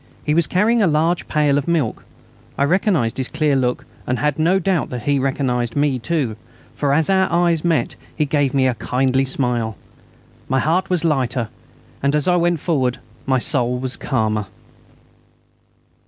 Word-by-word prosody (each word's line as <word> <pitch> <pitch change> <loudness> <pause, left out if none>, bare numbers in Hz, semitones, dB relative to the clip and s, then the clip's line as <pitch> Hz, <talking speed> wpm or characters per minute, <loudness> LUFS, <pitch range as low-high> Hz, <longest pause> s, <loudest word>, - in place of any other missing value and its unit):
He 150 - 0
was 170 +1 +3
carrying 220 +5 +2
a 200 - +4
large 165 +2 +1
pail 145 -2 +2
of 140 - -6
milk. 160 -9 -1 0.5
I - - +2
recognised 155 - +1
his 130 - -1
clear 150 -3 0
look, 125 -2 0 0.2
and 125 - 0
had 150 +1 -1
no 170 +5 +3
doubt 190 -4 0
that 125 -3 -5
he 145 -1 +1
recognised 125 -3 -1
me 145 -3 +1
too, 130 -6 -2 0.4
for 140 -2 -1
as 155 +2 +2
our 190 -2 +2
eyes 170 -2 +2
met 170 -3 0 0.2
he 155 - +1
gave 145 -2 +1
me 135 -1 +2
a 130 - +2
kindly 130 +3 0
smile. 120 -5 -2 0.7
My 130 - +2
heart 165 +7 +1
was 175 -3 0
lighter 130 -6 0 0.5
as 145 +2 +1
I 180 - +4
went 175 -1 +1
forward, 130 -7 0
and 125 - -22 0.2
my 130 -1 +3
soul 125 -1 0
was 130 0 -4
calmer. 110 -5 -1
140 Hz, 170 wpm, -20 LUFS, 125-165 Hz, 0.7 s, a